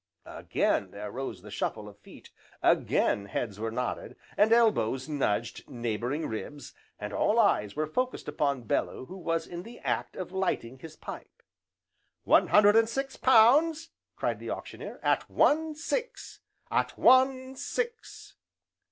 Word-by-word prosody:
Again - - -1
there 105 0 -7
rose 115 -7 -6
the 105 - -11
shuffle 105 +1 -3
of 100 0 -13
feet, - - -15 0.3
again 100 - +2
heads 100 0 -4
were 115 +1 -2
nodded, 120 +2 -4 0.2
and 210 +2 +4
elbows 180 - +3
nudged 125 -7 -2
neighbouring 120 +5 -3
ribs, 140 +6 -6 0.2
and 105 0 -6
all 210 - +2
eyes 105 - +2
were 155 - 0
focussed 250 - -3
upon 140 -3 -1
Bellew 115 - -2
who 185 - -10
was 165 -1 -1
in 175 0 -7
the 235 +5 -11
act - - -2
of 185 - -6
lighting 155 -10 -2
his 155 +2 -11
pipe. - - -10 0.8
"One - - +4
hundred 205 0 +6
and 225 0 +4
six 270 +3 -3
pounds!" 300 +7 +4 0.3
cried - - -2
the - - -7
Auctioneer, - - -7
"at - - +1
one 315 +1 +2
six! 470 +10 -4 0.3
at - - 0
one 260 0 +4
six! 475 - -5
165 Hz, 145 wpm, -29 LUFS, -, 0.8 s, hundred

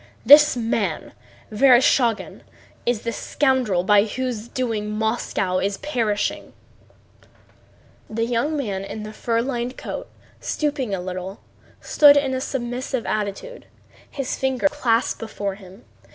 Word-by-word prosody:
"This 295 -1 +8
man, 225 -8 -2 0.4
Vereshchágin, 245 -1 +3 0.5
is 240 -3 0
the 230 - -2
scoundrel 250 -8 0
by 205 +1 +4
whose 240 -1 -4
doing 225 -4 -3
Moscow 215 -4 -1
is 200 +1 -1
perishing." 225 -8 -2 1.6
The 225 +1 -1
young 245 +6 -1
man 200 -8 -3
in 210 +2 -7
the 215 0 -8
fur 230 +1 -1
lined 250 -1 -3
coat, - - -6 0.3
stooping 285 -9 -2
a - - -5
little, 185 +2 -6 0.4
stood 290 -1 +6
in 275 -2 +1
a 260 - -2
submissive 250 -1 -3
attitude, 215 - -4 0.4
his 275 -3 -3
fingers 265 +2 0
clasped 240 -5 0
before 205 -3 -4
him. 195 +2 -15
230 Hz, 125 wpm, -22 LUFS, 210-260 Hz, 1.6 s, This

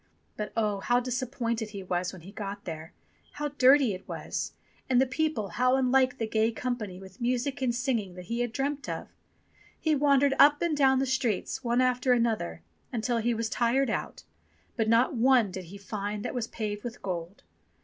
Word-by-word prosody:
But 210 0 -4
oh! 210 -3 +1
how 245 +5 +2
disappointed 245 -2 -2
he 200 -2 -7
was 180 0 -1
when 185 -4 -12
he 190 - -10
got 200 -1 -6
there. 160 -1 -6 0.4
How 295 0 -3
dirty 270 -4 +5
it 185 - -9
was! - - -4 0.4
And 250 -1 +4
the 265 - +5
people, 265 -6 -1
how 255 +7 +2
unlike 260 -1 +3
the 225 - -1
gay 220 +1 +1
company, 225 -5 -4
with 190 +3 -13
music 255 +3 -1
and 245 -2 +1
singing, 235 -7 -1
that 180 0 -9
he 235 +5 -3
had 240 -1 0
dreamt 280 +3 -2
of! - - -5 0.7
He 315 - +1
wandered 280 -1 +4
up 290 +1 +7
and 340 -3 +1
down 265 -2 +4
the 270 - +2
streets, 255 -3 -1
one 240 +1 +2
after 255 0 +3
another, 220 - 0 0.3
until 235 0 0
he 235 +1 +1
was 225 0 -1
tired 245 +4 +1
out, - - -4 0.5
but 225 -2 0
not 230 +4 +4
one 245 -4 +4
did 185 0 -6
he 190 +4 -10
find 205 +1 -4
that - - -3
was 245 -3 -2
paved 210 -2 -4
with 240 -1 -7
gold. 175 0 -5
235 Hz, 190 wpm, -28 LUFS, 205-260 Hz, 0.7 s, up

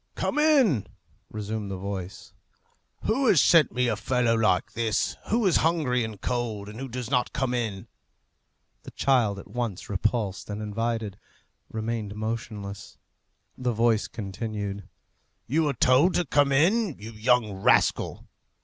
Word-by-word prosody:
"Come - - -1
in," 265 - +4 0.4
resumed 105 -1 -4
the 95 - -4
voice. 95 0 -6 0.7
"Who 260 +4 +1
has 180 - +6
sent 160 -2 +5
me 125 0 +1
a 115 - +1
fellow 120 +2 +1
like 105 -5 +2
this, 110 -3 0
who 230 0 +1
is 185 - +4
hungry 150 -7 +1
and 110 -3 -6
cold, 110 -3 -3
and 105 +3 -9
who 135 - -4
does 125 0 -6
not 125 -2 +1
come 125 -1 -1
in?" 110 -6 -3 0.9
The - - -10
child, 120 -7 +2
at 100 - -10
once 115 -6 -4
repulsed 105 -1 -1
and 105 0 -4
invited, 110 -1 -3 0.5
remained 110 -2 -4
motionless. 105 -2 -5 0.6
The 125 -2 -1
voice 115 -1 +2
continued, 100 -1 -5 0.6
"You 155 +5 +1
are - - 0
told 130 +10 +4
to 175 - +1
come 145 0 +2
in, 175 - +2
you 110 +2 -9
young 115 -1 +2
rascal." 95 - +1
115 Hz, 145 wpm, -26 LUFS, 105-130 Hz, 0.9 s, has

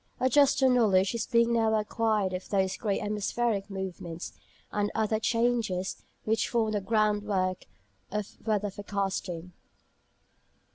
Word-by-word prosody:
A 260 - +3
juster 275 -1 +5
knowledge 210 -6 +4
is 235 - -2
being 235 -1 +3
now 225 -1 +3
acquired 215 -2 0
of 185 0 -5
those 190 -2 +1
great 200 0 -1
atmospheric 210 0 -1
movements, 185 -3 -6 0.4
and 205 0 0
other 220 0 +1
changes, 230 -5 0 0.2
which 220 +1 +1
form 225 -2 +1
the 205 -1 0
groundwork 205 -3 0 0.4
of 210 0 -4
weather 210 -2 0
forecasting. 190 -3 -3
210 Hz, 125 wpm, -29 LUFS, 190-225 Hz, 0.4 s, juster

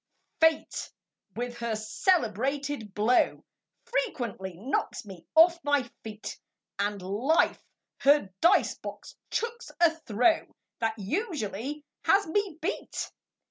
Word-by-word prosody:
Fate 320 -1 +2 0.5
with 240 +1 -4
her 235 -2 -1
celebrated 265 - 0
blow 220 +4 +3 0.4
Frequently 245 - -2
knocks 235 +2 -2
me 190 -4 -11
off 335 +1 +6
my 290 -2 +3 0.2
feet; 215 -1 -7 0.4
And 205 0 0
Life 245 - +2 0.4
her 280 -9 +4
dice 370 +4 +5
box - - -8
chucks 470 +1 -3
a 340 -2 +6
throw 315 +2 +1 0.2
That 225 -1 0
usually 285 - -3 0.2
has 400 +1 +5
me 380 -1 -1
beat. 355 +7 -3
275 Hz, 105 wpm, -28 LUFS, 215-330 Hz, 0.5 s, off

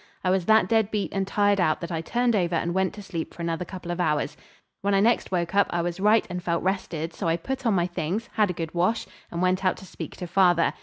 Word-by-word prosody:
I 185 - +2
was 190 -2 +1
that 220 0 +5
dead 220 -3 +2
beat 210 -2 -2
and 195 -1 -1
tired 205 0 +2
out 155 -3 +2
that 170 0 -5
I 165 -1 -1
turned 240 +7 +1
over 175 -3 +1
and 170 +1 0
went 190 0 +1
to 205 - -9
sleep 170 -4 -5
for 170 - -6
another 170 +1 -2
couple 180 -1 -7
of 175 - -4
hours. 150 -3 0 0.5
When 200 0 +1
I - - +4
next 225 +1 +2
woke 170 -1 -1
up 200 -1 +4
I 175 -1 -1
was 175 +1 -3
right 210 +3 +4
and 180 0 -4
felt 170 -1 -1
rested, 175 -4 -2
so - - -3
I 165 0 +2
put 265 +7 -3
on 215 - +3
my 175 -2 +2
things, 180 +6 -3
had 210 -2 +2
a - - -1
good 165 -2 -5
wash, 180 +6 +1 0.2
and 170 +1 -2
went 185 +1 +1
out 185 - +2
to - - -11
speak - - -8
to 180 - -5
father. 175 -1 +3
185 Hz, 270 wpm, -25 LUFS, 170-200 Hz, 0.5 s, that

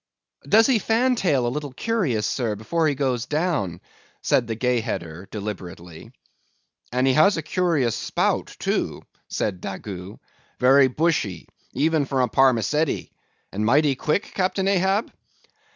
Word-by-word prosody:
"Does 225 +2 +6
he 255 -5 +3
fan 235 +5 +2
tail 150 - +1
a - - +1
little 145 -2 -5
curious, 165 - -1
sir, 115 -5 -1
before 160 +10 0
he 145 - 0
goes 130 -3 -1
down?" 150 - -1 0.4
said 120 - +2
the 115 - -3
Gay 125 +1 +1
Header 85 -4 -5
deliberately. 90 -5 -8 0.8
"And 125 +2 +1
has 155 +9 +5
he - - -2
a - - -5
curious 155 - +1
spout, - - -1
too," - - -2 0.2
said 95 -4 -3
Daggoo, 95 0 -7 0.4
"very 135 +2 +6
bushy, 130 - -1 0.3
even 155 +2 +1
for 135 -1 0
a - - +2
parmacetty, 135 +4 +1 0.4
and 105 +2 -3
mighty 140 +5 +3
quick, 155 +10 -1
Captain 190 0 0
Ahab?" 195 +2 +1
135 Hz, 140 wpm, -23 LUFS, 110-165 Hz, 0.8 s, Does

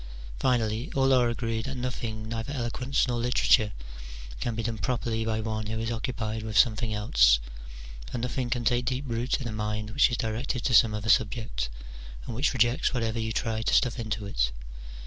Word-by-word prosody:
Finally, 115 -2 0
all 135 0 +4
are 125 -2 +4
agreed 115 -1 -2
that 135 0 -4
nothing, 115 -3 -4
neither 115 +3 -4
eloquence 130 +1 0
nor 120 -1 -1
literature, 115 -2 +3 0.7
can 120 - -2
be 115 - -3
done 115 -1 -3
properly 115 +1 -1
by 110 -1 -1
one 110 -1 -3
who 110 +1 -3
is 115 +1 -2
occupied 110 -2 -3
with 110 -1 -3
something 110 +2 +3
else; - - +4 0.7
for - - -3
nothing 125 +1 -2
can 120 -1 -1
take 120 +1 +2
deep 130 +3 -2
root 120 +2 -1
in 130 - -4
a - - -3
mind 105 0 -3
which 140 +4 +4
is 120 - -2
directed 120 +3 -2
to 125 - 0
some 110 0 +6
other 105 +1 -4
subject, 105 - +1 0.6
and - - -5
which 130 +6 +1
rejects 120 +1 +2
whatever 115 -1 -1
you 110 0 -2
try 110 0 -1
to 110 - +2
stuff 125 -2 +2
into 110 -2 -3
it. - - 0
115 Hz, 190 wpm, -27 LUFS, 110-125 Hz, 0.7 s, some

